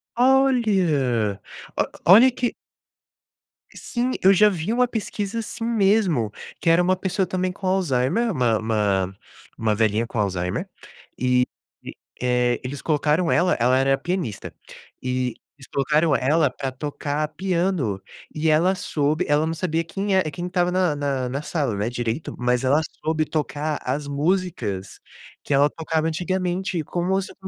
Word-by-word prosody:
Olha, 190 - +2 0.7
o - - +6
olha 235 +7 +8
que 245 0 -2 1.2
Sim, 245 +1 -2
eu 190 +1 +7
já 210 +2 +6
vi 180 +1 -3
uma 250 +1 +3
pesquisa 220 -2 -3
assim 225 +1 -5
mesmo, 195 - +2 0.3
que 165 - +1
era 165 +2 +5
uma 185 +1 +2
pessoa 190 +1 -1
também 185 0 -1
com 185 +1 -6
Alzheimer, 185 - +1
uma 120 - +2
uma 100 -4 0 0.4
uma 110 -1 +1
velhinha 110 +1 +1
com 120 - -7
Alzheimer, 90 -3 -2 0.5
e 125 0 +2 0.4
e, - - -8 0.3
eh, 125 -1 +1
eles 135 +2 -5
colocaram 155 +2 +1
ela 180 +1 +3
ela 125 +2 +3
era 135 0 +3
pianista, 175 - -4 0.5
e 125 -1 -1 0.2
eles 135 - -14
colocaram 150 +2 +2
ela 150 +3 +2
para 135 +1 -4
tocar 145 +2 -3
piano 170 - -1 0.3
e 155 +1 -1
ela 165 +5 +4
soube, 155 -1 -1
ela 150 +1 +2
não 160 - -1
sabia 165 -1 -1
quem 195 +4 -2
é 190 - +4
quem 175 +5 -5
estava 180 -1 +1
na 180 -4 +1
na 140 -3 -1
na 140 +3 -3
sala 145 - -2
né, 105 +3 -1
direito, 120 +3 -3
mas 125 +1 +1
ela 140 +4 +3 0.2
soube 155 0 +1
tocar 150 -1 -2
as 140 +3 -2
músicas 145 - -2 0.4
que - - -2
ela 145 +2 +4
tocava 160 0 -2
antigamente, 180 +1 -2
como 180 +4 0
se 190 - -8
155 Hz, 150 wpm, -23 LUFS, 125-185 Hz, 1.2 s, olha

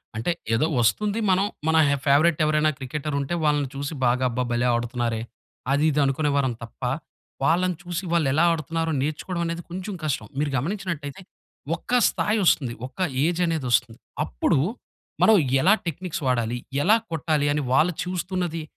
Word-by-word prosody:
అంటే 115 +11 -1 0.2
ఏదో 115 +7 +3
వస్తుంది, 205 - +1
మనం 190 +2 +3 0.2
మన 160 - +3
హ 140 - +3
ఫేవరైట్ 155 +3 +4
ఎవరైనా 155 0 +3
క్రికెటర్ 140 +2 -4
ఉంటే 140 +5 -3
వాళ్ళని 145 -2 +2
చూసి 145 +3 -4
బాగా 125 +2 +2
అబ్బా 125 +2 -1
భలే 120 +1 +1
ఆడుతున్నారే, 120 -1 -2 0.5
అది 145 +3 +2
ఇది 150 - 0
అనుకునేవారం 140 -2 +1
తప్ప, 115 - -12 0.6
వాళ్ళని 175 +4 +2
చూసి 175 +2 -4
వాళ్ళు 160 -5 +2
ఎలా 155 +3 +3
ఆడుతున్నారో 165 +1 -2
నేర్చుకోవడం 165 +4 -3
అనేది 170 +1 -3
కొంచెం 185 +3 -5
కష్టం. 125 -8 -2
మీరు 145 -1 0
గమనించినట్లయితే 170 -1 -4 0.5
ఒక 245 +8 0
స్థాయి 210 +1 0
వస్తుంది, 130 -8 +3
ఒక 165 - -23 0.3
ఏజనేది 165 -4 0
వస్తుంది. 115 -1 +1 0.3
అప్పుడు - - +1 0.6
మనం 220 -1 +7 0.3
ఎలా 195 +7 +6
టెక్నిక్స్ 170 0 -4
వాడాలి, 120 -1 0 0.3
ఎలా 215 +4 +6 0.2
కొట్టాలి 155 -2 0
అని 150 - 0
వాళ్ళు 165 +5 +4
చూస్తున్నది, 180 -2 -3
155 Hz, 150 wpm, -24 LUFS, 135-175 Hz, 0.6 s, మనం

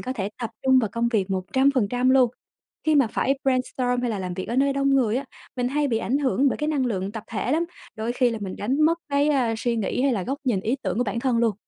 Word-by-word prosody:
có 255 - -3
thể 200 -6 -3
tập 230 - -3
trung 260 -1 +5
vào 230 -4 +1
công 235 0 0
việc 205 -5 0
100% 250 +4 +1
luôn. 260 -2 +5 0.5
Khi 310 - +3
mà 275 -5 +5
phải 270 +5 0
brainstorm 255 -1 0
hay 245 - 0
là 210 - -2
làm 180 -1 -4
việc 185 +1 -5
ở 235 - -2
nơi 275 +1 +3
đông 275 0 +1
người 250 -5 +2
á, 275 - -2 0.3
mình 245 0 0
hay 290 +1 0
bị 225 - +1
ảnh 260 +5 0
hưởng 275 0 +2
bởi - - -1
cái 300 0 -1
năng 275 -5 +1
lượng 195 -3 -2
tập 220 -1 -7
thể 230 +4 -1
lắm, 330 +2 +2 0.3
đôi 225 +1 -3
khi 250 0 +2
là 230 - -3
mình 190 -2 -5
đánh 260 +8 -1
mất 330 +2 +3
cái, 285 +1 +2
a, 255 -6 +2
suy 235 0 -1
nghĩ, 225 +4 -1
hay 275 - +3
là 205 -6 -1
góc 270 +9 -3
nhìn, 235 -7 +1
ý 225 +7 -1
tưởng 190 +1 -2
của 245 - +2
bản 220 +1 -2
thân 245 -2 +1
luôn. 230 -2 +2
245 Hz, 275 wpm, -24 LUFS, 220-270 Hz, 0.5 s, trung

